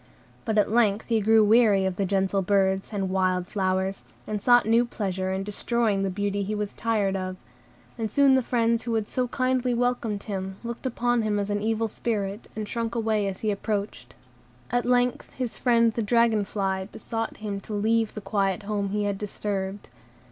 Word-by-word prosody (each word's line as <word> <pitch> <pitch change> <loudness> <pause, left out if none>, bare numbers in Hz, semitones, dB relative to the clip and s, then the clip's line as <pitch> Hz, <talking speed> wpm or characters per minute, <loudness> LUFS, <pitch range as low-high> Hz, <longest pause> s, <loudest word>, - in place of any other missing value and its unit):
But 220 -2 0
at 210 - +3
length 220 -3 +2
he 225 -2 +2
grew 220 +1 +5
weary 210 -3 +5
of 190 -1 -1
the 195 0 -1
gentle 195 0 +1
birds, 190 0 +1
and 195 -3 -2
wild 185 -1 +1
flowers, 190 0 -1 0.2
and 210 -1 -3
sought 245 +2 +5
new 230 +2 +4
pleasure 190 -5 -3
in 190 +1 -2
destroying 210 0 0
the 195 - 0
beauty 200 +1 -1
he 205 +2 -2
was 210 -1 -3
tired 210 -4 0
of; 185 -1 -3 0.6
and 220 -1 -1
soon 275 +4 +4
the 260 - +4
friends 230 -1 +1
who 230 -1 -2
had 220 -2 -1
so 255 -1 -1
kindly 255 0 0
welcomed 235 -4 -1
him 190 -2 -4
looked 235 +2 -4
upon 240 -1 +1
him 215 -1 0
as 205 0 -1
an 205 0 -1
evil 225 +1 0
spirit, 210 -2 -3
and 215 -1 -4
shrunk 230 +1 -3
away 220 -3 +1
as 190 -1 -5
he 215 - +1
approached. 200 - -4 0.6
At 245 0 0
length 245 0 +1
his 250 -3 -4
friend 235 -2 +3
the 230 - -1
dragon 225 -1 +3
fly 190 -1 -2
besought 225 -1 -4
him 205 -2 -4
to 210 - -8
leave 220 +1 +1
the 215 - -5
quiet 195 0 0
home 200 -1 -2
he 210 +1 -1
had 200 -1 -1
disturbed. 200 -1 -4
210 Hz, 190 wpm, -26 LUFS, 195-230 Hz, 0.6 s, grew